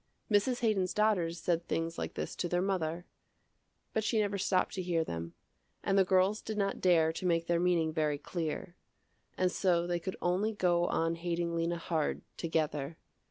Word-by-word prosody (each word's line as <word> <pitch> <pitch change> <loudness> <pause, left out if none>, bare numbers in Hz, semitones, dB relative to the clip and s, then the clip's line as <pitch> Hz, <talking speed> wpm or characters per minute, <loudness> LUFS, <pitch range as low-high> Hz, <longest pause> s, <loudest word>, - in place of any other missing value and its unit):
Mrs. 215 +5 +2
Haydon's 200 -6 +1
daughters 180 -6 +2
said 170 0 0
things 165 0 -2
like - - -4
this - - -4
to 175 - -1
their 175 - +1
mother, 175 -3 -1 0.9
but 220 - +1
she 225 - +1
never 205 -2 +1
stopped 185 -1 +1
to 190 - -2
hear 175 -2 +1
them, 85 - -5 0.5
and 195 - +1
the 195 - +6
girls 190 +3 +3
did 220 -1 -5
not 200 -1 -1
dare 165 -3 +4
to 185 - -5
make 165 -1 +2
their 170 0 +1
meaning 170 -3 +2
very 155 -2 +1
clear. 170 +3 -4 0.6
And 185 -1 +2
so 175 -3 +2
they 175 0 -1
could 190 +2 -4
only 190 +5 +1
go 175 -3 +2
on 165 0 +1
hating 170 0 -2
Lena 170 +1 0
hard, 165 -2 -1
together. 155 -2 -1
175 Hz, 180 wpm, -32 LUFS, 165-190 Hz, 0.9 s, the